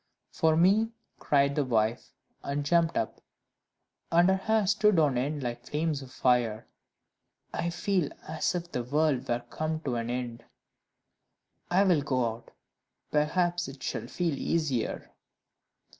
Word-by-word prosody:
"For 160 -1 +2
me," 200 +6 +4 0.3
cried 140 -1 +2
the 145 - +1
wife, 115 -2 0 0.3
and 140 +1 -3
jumped 165 +2 +2
up, 110 - -2 0.9
and 175 +2 +5
her 190 - +4
hair 215 +2 +1
stood 210 0 +3
on 150 -5 +3
end 140 +3 -1
like 120 0 -5
flames 150 -1 -1
of 130 -1 -11
fire, 120 -4 +1 0.9
"I 170 - -1
feel 175 -2 0 0.2
as 160 +3 -1
if 175 0 -4
the 125 - -1
world 140 0 +1
were 120 0 0
come 155 0 -2
to 130 -6 -2
an 115 0 -3
end; 120 -1 -4 1.3
I 185 +3 +4
will 180 -6 +3
go 130 -4 0
out 115 +1 -12 0.6
perhaps 175 +3 +1
I - - -7
shall - - -4
feel 175 -3 -1
easier." 140 -4 -1
150 Hz, 145 wpm, -29 LUFS, 125-175 Hz, 1.3 s, and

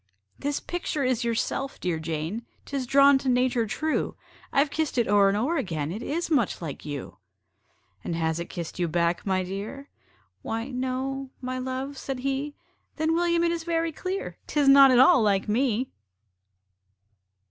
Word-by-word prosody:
"This 285 0 -1
picture 345 -4 -3
is 255 -2 +1
yourself, 235 +4 -2
dear 175 -3 -1
Jane 160 +7 -3 0.2
'Tis 275 -3 -3
drawn 275 +1 +6
to 265 - -2
nature 250 -2 +2
true: 310 +8 -1 0.4
I've 280 +1 +2
kissed 315 -4 -1
it 235 - +2
o'er 200 -1 +5
and 200 - +1
o'er 285 +10 0
again, 160 - -2
It 210 +6 -5
is 330 +6 -3
much 260 -10 +2
like 160 -5 -6
you." 145 -3 -6 0.9
"And 170 - -3
has 160 0 0
it 170 - -5
kissed 170 0 -6
you 175 - +1
back, 170 +3 0
my 190 -1 +1
dear?" 205 +10 -6 0.5
"Why 225 +3 -3
no 260 +1 -3
my 255 0 -4
love," 260 +2 -4
said 265 -2 -4
he. 275 +2 -2 0.4
"Then, 315 +1 +1
William, 340 0 +2
it 340 - +2
is 335 -1 -3
very 330 -1 0
clear 370 +5 -5
'Tis 290 -2 +1
not 275 0 +9
at 255 - +5
all 260 0 +7
LIKE 200 -2 +2
ME!" 245 +2 +1
255 Hz, 170 wpm, -26 LUFS, 200-280 Hz, 0.9 s, not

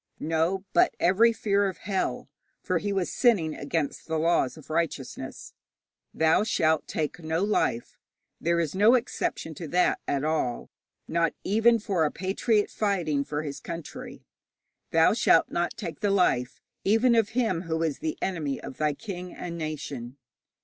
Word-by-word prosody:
No, 165 +5 0
but - - +4
every 200 +7 +5
fear 200 -3 +1
of 185 - -8
hell, 195 -1 -1 0.3
for 180 -4 -1
he 205 +2 -2
was 190 -3 -1
sinning 200 -11 +3
against 160 -2 -3
the 160 -1 -1
laws 160 -3 +1
of 155 - -12
righteousness 165 -1 -3 0.6
'Thou 160 +4 +3
shalt 160 -7 +1
take 155 +2 -3
no 160 +2 -1
life.' 200 - 0 0.4
There 170 +1 +1
is 160 -3 -1
no 210 +6 +5
exception 235 -8 -2
to 165 +1 -7
that 180 +4 +2
at 140 -1 0
all, 150 -6 -1 0.4
not 165 0 +1
even 225 +4 +4
for 195 -6 0
a 150 - +2
patriot 205 +5 0
fighting 175 -9 0
for 150 +1 -3
his 140 -2 -5
country. 170 -1 -8 0.6
'Thou - - +4
shalt - - +4
not 175 0 -1
take 175 -6 -6
the 205 - +1
life 155 -11 +1 0.2
even 225 +5 +4
of 225 -2 +3
him 215 -9 +1
who 160 0 0
is 155 -4 -1
the 315 -1 -3
enemy 155 -7 -2
of - - -9
thy 150 -1 +1
king 180 -2 -7
and 170 -1 -6
nation.' 145 -6 -5
170 Hz, 160 wpm, -27 LUFS, 155-200 Hz, 0.6 s, every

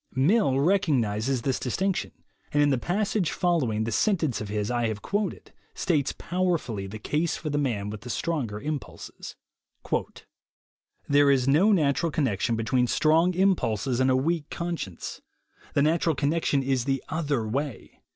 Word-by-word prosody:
Mill 140 - +3
recognizes 135 - +1
this 135 -2 0
distinction, 190 +9 -1 0.4
and 145 0 +3
in 145 - +3
the 130 - +1
passage 195 - 0
following 140 - 0
the 115 - -2
sentence 160 - +1
of 105 - -5
his 105 +1 -2
I 120 -1 +1
have 105 -2 -4
quoted, 205 -2 -3 0.2
states 155 -7 +1
powerfully 170 - -1
the 105 +3 -7
case 150 +9 -1
for 155 -1 -4
the 145 - 0
man 105 -8 -1
with 115 +3 -7
stronger 130 -12 -2
impulses: 150 +2 -6 1.7
"There 145 0 +5
is 135 -2 +3
no 165 +10 +5
natural 160 -2 +2
connection 120 -6 0
between 125 +3 +1
strong 165 +7 +3
impulses 130 - +1
and 130 0 +3
a 130 - +4
weak 155 +3 0
conscience. 170 - -5 0.5
The 140 - +4
natural 160 +1 +2
connection 145 -1 +1
is 130 -2 0
the 135 -1 -1
other 145 -8 -1
way. 135 +3 -4
140 Hz, 150 wpm, -26 LUFS, 120-170 Hz, 1.7 s, There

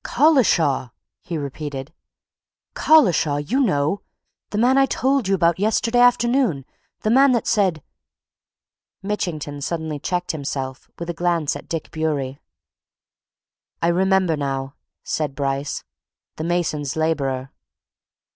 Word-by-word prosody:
"Collishaw!" 230 - +3 0.3
he 170 - -4
repeated. 145 0 -6 0.8
"Collishaw, 180 - +4
you 175 - -1
know! 180 - +1 0.5
The 205 - -3
man 245 +4 +4
I 270 0 +4
told 265 -3 +1
you 195 - +3
about 170 -1 +2
yesterday 225 +3 +1
afternoon. 240 - +3 0.4
The 215 - +1
man 265 +2 +6
that 235 - 0
said 190 -8 +1 0.7
" - - -57
Mitchington 155 -8 -3
suddenly 160 -1 -3
checked 180 +4 -2
himself, 135 -3 -5
with 170 0 -4
a - - -7
glance 170 -3 0
at - - -10
Dick 165 -2 -4
Bewery. 145 -4 -2 1.4
"I 170 - +2
remember 190 -1 +2
now," 135 -2 -3 0.3
said 150 -3 -2
Bryce. 140 0 -2 0.5
"The 155 - -3
mason's 160 -5 -1
labourer! 135 -5 -1
165 Hz, 120 wpm, -22 LUFS, 145-210 Hz, 1.4 s, man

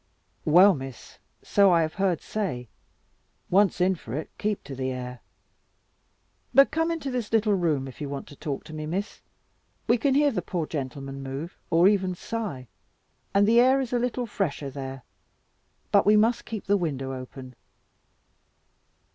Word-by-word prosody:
"Well, 180 +6 +7
Miss, 135 -5 -9 0.2
so 200 -2 +4
I 170 -1 +4
have 155 - -3
heard 190 -4 0
say. 140 - -4 0.8
Once 195 +1 +4
in 185 +1 +3
for 130 -9 -7
it, 155 - -5
keep 210 -1 -1
to 140 - -8
the 130 0 -2
air. 125 -1 -5 1.4
But 275 0 +7
come 325 +1 +1
into 325 -5 -3
this 245 -4 -3
little 220 -2 +3
room, 160 -8 0
if 130 - -11
you 145 - -3
want 140 -1 -5
to 145 - -12
talk 145 -2 -4
to 155 - -11
me, 155 0 -5
Miss. 195 +6 -4 0.7
We 235 - +3
can 270 +3 +2
hear 290 0 +4
the 225 - -2
poor 175 -4 -3
gentleman 135 -2 -5
move, 135 +6 -6
or 170 +3 +5
even 190 -3 +2
sigh; 180 - -5 0.7
and 200 +1 +5
the 230 +2 +5
air 260 +2 +5
is 255 -2 -3
a 245 - +2
little 245 0 -1
fresher 155 -10 -3
there. 135 -1 -7 0.9
But - - +4
we 210 0 +6
must 225 +3 +2
keep 220 -3 -6
the 200 +1 +3
window 135 -7 -3
open." 130 0 -9
175 Hz, 170 wpm, -26 LUFS, 135-215 Hz, 1.4 s, Well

